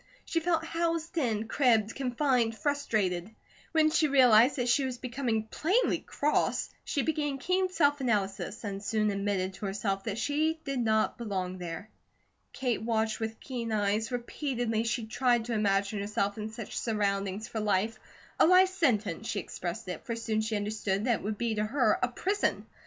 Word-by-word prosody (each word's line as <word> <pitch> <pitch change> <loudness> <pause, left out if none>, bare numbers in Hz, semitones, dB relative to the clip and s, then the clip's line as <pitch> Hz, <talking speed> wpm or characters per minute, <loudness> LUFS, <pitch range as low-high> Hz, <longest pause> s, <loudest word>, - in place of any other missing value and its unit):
She 330 - 0
felt 330 -1 0
housed 330 0 -1
in, 225 -5 0
cribbed, 225 -5 +3
confined, 250 -3 +1
frustrated. 210 -9 0 0.4
When 315 -1 +4
she 315 -1 +3
realized 255 -2 +6
that 250 -3 -1
she 270 +3 +3
was 260 -2 -3
becoming 240 -3 -1
plainly 360 - +1
cross, 300 +1 0
she 280 - -1
began 295 -3 -1
keen 370 +6 +1
self 290 -5 +2
analysis 210 -2 -1
and 200 -1 -4
soon 215 0 +1
admitted 195 -1 -1
to 200 +2 -5
herself 195 0 -2
that 215 -2 -2
she 305 +6 0
did 275 -2 -2
not 220 -1 +1
belong 185 -5 -3
there. 175 +4 -6 0.6
Kate 250 -3 -1
watched 220 -1 0
with 225 0 -4
keen 240 -4 -4
eyes. 215 +2 0
Repeatedly 240 -2 -2
she 230 0 -1
tried 240 +1 +1
to 240 - -3
imagine 200 -1 +1
herself 205 0 -1
in 215 0 -5
such 220 -1 -6
surroundings 200 -2 -1
for 220 - -4
life, 210 +1 0 0.4
a - - +7
life 365 +1 +6
sentence, 225 - 0
she 205 - -1
expressed 185 +4 -5
it, 180 - -5
for 230 - -3
soon 225 -1 -1
she 220 0 -2
understood 205 -1 -1
that 240 -3 +2
it - - -12
would 210 +1 -2
be 235 0 0
to 210 0 0
her, 225 0 +2
a 250 - +3
prison. 390 +11 -1
225 Hz, 175 wpm, -30 LUFS, 210-270 Hz, 0.6 s, a